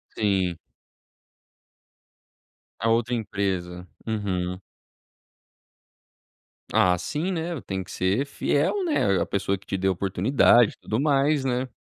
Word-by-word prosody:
Sim. 95 -5 +1 2.2
A 115 - +1
outra 115 +1 +1
empresa. 95 -5 -3 0.2
Uhum 95 -5 -2 2.1
Ah, 90 -1 +4
sim, 150 - -2
né, 170 -4 -3
tem 95 -1 -4
que 90 - -11
ser 95 +9 0
fiel, 145 - 0
né, 105 - +2
à - - +1
pessoa 100 0 -1
que 95 - -22
te 95 - -2
deu 95 0 +1
oportunidade, 105 +5 +3
e - - -23
tudo 110 +3 -2
mais, 140 0 +2
né. 130 0 -1
105 Hz, 115 wpm, -25 LUFS, 95-135 Hz, 2.2 s, Ah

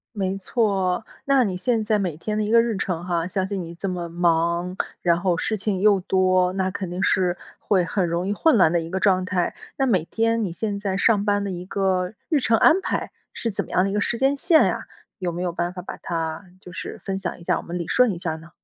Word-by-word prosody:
没 195 -1 -1
错。 195 -1 0 0.2
那 275 -2 +4
你 195 -5 -1
现 225 +4 0
在 210 0 +2
每 180 -6 -2
天 210 +5 -3
的 215 - +1
一 210 - -2
个 230 0 +7
日 230 -2 -1
程 175 -3 -3
哈 170 -2 -1
相 190 0 -1
信 195 -1 -3
你 170 0 -8
这 195 - -4
么 175 -2 -3
忙， 170 +1 +1 0.3
然 170 -1 +2
后 180 -2 +1
事 215 +6 -1
情 205 -1 -1
又 205 0 +4
多， 185 -1 +2
那 190 -1 -1
肯 195 -2 -4
定 180 +2 -4
是， 180 -2 +2 0.2
会 190 -3 +2
很 185 0 0
容 170 +2 -1
易 205 - 0
混 315 +7 +3
乱 170 -5 +5
的 170 - +3
一 165 - -7
个 190 +2 -2
状 185 -2 +3
态。 180 -1 0 0.2
那 270 - +2
每 195 -10 +2
天 230 +3 0
你 190 - -2
现 200 +3 -3
在 195 -2 -2
上 205 0 +3
班 205 -1 +1
的 200 - -3
一 180 0 -6
个 190 -1 0 0.2
日 310 -4 +3
程 230 -3 +3
安 345 - +5
排， - - -2 0.2
是 230 - -2
怎 195 - -1
么 - - -15
样 185 - +3
的 195 - 0
一 - - -3
个 210 - +1
时 235 - 0
间 270 +3 +2
线 325 +2 +4
呀？ - - -2 0.3
有 180 -2 -2
没 170 +1 -5
有 180 -1 -1
办 175 +1 -2
法 180 - -6
把 180 - -8
它 165 +1 -3 0.2
就 180 - -11
是 - - -7
分 195 -1 -2
享 190 - -4
一 - - -12
下 - - +1
我 - - -4
们 175 +1 -5
理 170 -2 -4
顺 250 -3 +4
一 180 - -4
下 170 -2 -3
儿 160 - -4
呢？ 165 +1 -14
190 Hz, 285 characters per minute, -23 LUFS, 175-210 Hz, 0.3 s, 个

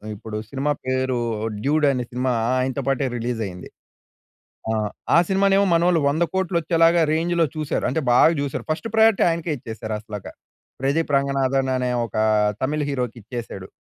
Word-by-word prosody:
ఇప్పుడు 105 +1 -7
సినిమా 140 +2 -1 0.2
పేరు 130 -1 0 0.4
'డ్యూడ్' 150 +2 +2
అనే 125 -2 -2
సినిమా 125 +1 -1 0.3
ఆయనతో 130 +2 -1
పాటే 135 0 +1
రిలీజ్ 120 0 -3
అయింది. 90 -1 -9 1.0
ఆహ్, 110 -1 -1 0.3
ఆ - - +7
సినిమానేమో 195 +1 +3
మనోళ్లు 170 0 +3
100,00,00,000 170 +4 -1
వచ్చేలాగా 165 +1 +3
రేంజ్‌లో 170 +1 +1
చూసారు. 155 -2 -2
అంటే 160 +5 -1
బాగ 125 - +6
చూసారు. 140 -2 -3
ఫస్ట్ 170 +8 -3
ప్రయారిటీ 220 -2 +5
ఆయనకే 165 0 -3
ఇచ్చేసారు 110 -2 -6
అసలక. 105 -2 -8 0.6
'ప్రదీప్ 145 +3 0
రంగనాథన్' 135 -1 0
అనే 125 -1 -1
ఒకా 110 0 -1 0.4
తమిళ్ 145 +2 0
హీరోకి 125 -4 -3
ఇచ్చేసాడు. 110 -4 -7
135 Hz, 145 wpm, -22 LUFS, 125-165 Hz, 1.0 s, ఆ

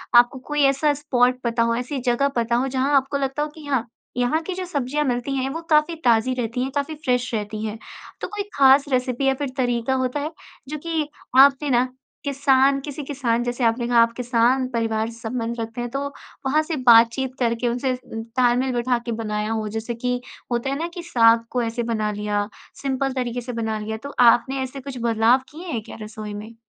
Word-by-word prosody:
आपको 245 +2 +6
कोई 295 0 0
ऐसा 275 +2 +3
स्पॉट 255 -3 +1
पता 230 -1 +1
हो, 230 0 +1
ऐसी 250 +3 -3
जगह 250 +2 +1
पता 235 0 +1
हो 250 +3 +1
जहाँ 270 +2 +1
आपको 275 +1 0
लगता 275 +1 -1
हो 300 - -3
कि 310 -2 -11
हाँ 265 -5 0 0.3
यहाँ 250 +6 +1
की 370 - -4
जो 370 0 -4
सब्जियाँ 295 -3 -1
मिलती 250 +1 -1
हैं 265 0 -1
वो 325 +4 -4
काफ़ी 305 +2 +3
ताज़ी 235 +1 +4
रहती 245 0 -2
है 265 - -2
काफ़ी 285 +2 -1
फ़्रेश 250 -5 -1
रहती 215 0 -3
हैं। 215 0 -4 0.4
तो - - -2
कोई 415 -1 -4
ख़ास 275 +1 +6
रेसिपी 255 +1 0
या 270 - +4
फ़िर 275 0 -3
तरीका 245 0 0
होता 255 +3 -1
है 300 +2 -3 0.4
जो 305 - -3
कि 320 -3 -1 0.3
आपने 280 +1 +6
ना 250 0 +3 0.4
किसान 275 -1 +3
किसी 290 0 -6
किसान 255 -4 -1
जैसे 245 +1 -2
आपने 235 +1 +1
कहा 240 -1 +4
आप 230 - 0
किसान 245 +1 +2
परिवार 225 -2 -1
से 230 0 -12
संबंध 235 0 -3
रखते 225 +2 -4
हैं 240 - -3
तो 275 +3 -3 0.5
वहाँ 300 +4 +3
से 320 +1 -3
बातचीत 235 +3 +5
करके 235 0 0
उनसे 250 +2 0
तालमेल 245 +3 0
बिठा 245 0 +1
के 235 - -3
बनाया 210 0 -2
हो 220 -1 -1
जैसे 225 +2 -3
कि 250 0 0 0.3
होता 240 +3 0
है 275 - -1
ना 335 - -1
कि 350 - -6
साग 230 -6 +4
को 250 - 0
ऐसे 230 +1 -2
बना 215 -2 -1
लिया 205 0 -1 0.3
सिंपल 270 -1 -1
तरीके 245 -2 -2
से 245 +1 -6
बना 220 -1 -2
लिया 220 +1 -4
तो 285 - -9
आपने 245 +3 +5
ऐसे 260 +1 -6
कुछ 270 -1 -7
बदलाव 230 +2 +4
किए 335 +5 -9
हैं 240 -10 -2
क्या - - -10
रसोई 215 -1 -7
में? 210 +2 -8
250 Hz, 210 wpm, -23 LUFS, 230-275 Hz, 0.5 s, आपको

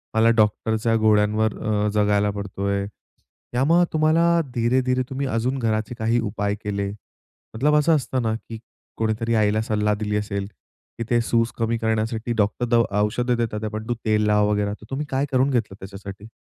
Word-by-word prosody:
मला 110 +1 +5
डॉक्टरच्या 110 +1 +1
गोळ्यांवर 110 0 +2 0.4
जगायला 105 -1 +2
पडतोय. 100 0 -3 0.7
यामग 165 +8 +4
तुम्हाला 165 +2 +3 0.2
धीरे-धीरे, 125 +2 +1
तुम्ही 135 +1 -2
अजून 125 +2 -1
घराचे 110 0 -1
काही 115 +2 +1
उपाय 105 -2 -2
केले? 100 -1 -2 0.6
मतलब 150 +6 +2
असं 155 +2 +4
असतं 130 -2 -1
ना, 110 -1 0 0.2
की 115 -1 -6 0.4
कोणीतरी 115 +1 0
आईला 110 0 +2
सल्ला 105 -1 0
दिली 105 0 -3
असेल, 100 -1 -3 0.5
की 115 - -2
ते 120 -1 +3
सूज 115 0 +1
कमी 115 0 0
करण्यासाठी 110 +1 -1
डॉक्टर 105 +3 +1
दवा 115 -4 +2
औषध 120 +4 0
देतात, 110 -2 -2
पण 110 +1 -5
तू 120 - 0
तेल 105 -1 +2
लाव 105 0 +3
वगैरे. 105 0 0
तर - - -12
तुम्ही 135 +3 -3
काय 135 +1 0
करून 130 +2 +3
घेतलं 115 -6 -1
त्याच्यासाठी? 100 +1 -9
110 Hz, 160 wpm, -23 LUFS, 105-120 Hz, 0.7 s, मला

